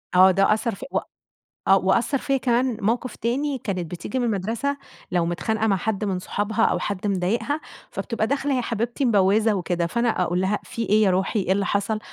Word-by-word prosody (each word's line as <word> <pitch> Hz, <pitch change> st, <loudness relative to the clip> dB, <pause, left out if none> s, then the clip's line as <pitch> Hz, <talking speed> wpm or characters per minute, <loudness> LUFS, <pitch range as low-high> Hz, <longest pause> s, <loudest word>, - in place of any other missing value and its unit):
آه 185 Hz, +1 st, +8 dB
ده 195 Hz, +3 st, +4 dB
أثّر 220 Hz, -1 st, -1 dB
في 260 Hz, -, -9 dB
و -, -, +2 dB, 0.7 s
آه 195 Hz, -, +7 dB
وأثر 235 Hz, +9 st, +1 dB
فيا 275 Hz, +1 st, 0 dB
كمان 245 Hz, -1 st, +1 dB
موقف 235 Hz, +4 st, -1 dB
تاني 270 Hz, +4 st, -1 dB
كانت 185 Hz, -7 st, -4 dB
بتيجي 180 Hz, +9 st, -4 dB
من 245 Hz, -, 0 dB
المدرسة 225 Hz, +7 st, -1 dB, 0.4 s
لو 175 Hz, -2 st, +2 dB
متخانقة 220 Hz, +6 st, -1 dB
مع 195 Hz, -3 st, +3 dB
حد 210 Hz, +2 st, -2 dB
من 190 Hz, -2 st, -1 dB
صحابها 210 Hz, +4 st, 0 dB
أو -, -, +2 dB
حد 200 Hz, 0 st, -3 dB
مضايقها 205 Hz, +10 st, 0 dB, 0.3 s
فبتبقى 225 Hz, -2 st, -2 dB
داخلة 280 Hz, +1 st, 0 dB
يا -, -, +1 dB
حبيبتي 235 Hz, +3 st, -2 dB
مبوزة 210 Hz, 0 st, +3 dB
وكده، 175 Hz, -2 st, -1 dB
فأنا 235 Hz, +5 st, 0 dB
أقول 175 Hz, +1 st, 0 dB
لها: 195 Hz, +2 st, +1 dB
"في 235 Hz, -2 st, -5 dB
إيه 215 Hz, +2 st, +4 dB
يا 195 Hz, -, +4 dB
روحي، 190 Hz, +3 st, +1 dB
إيه 190 Hz, 0 st, +1 dB
اللي 200 Hz, +1 st, +1 dB
حصل؟" 205 Hz, +2 st, 0 dB
215 Hz, 200 wpm, -24 LUFS, 190-240 Hz, 0.7 s, آه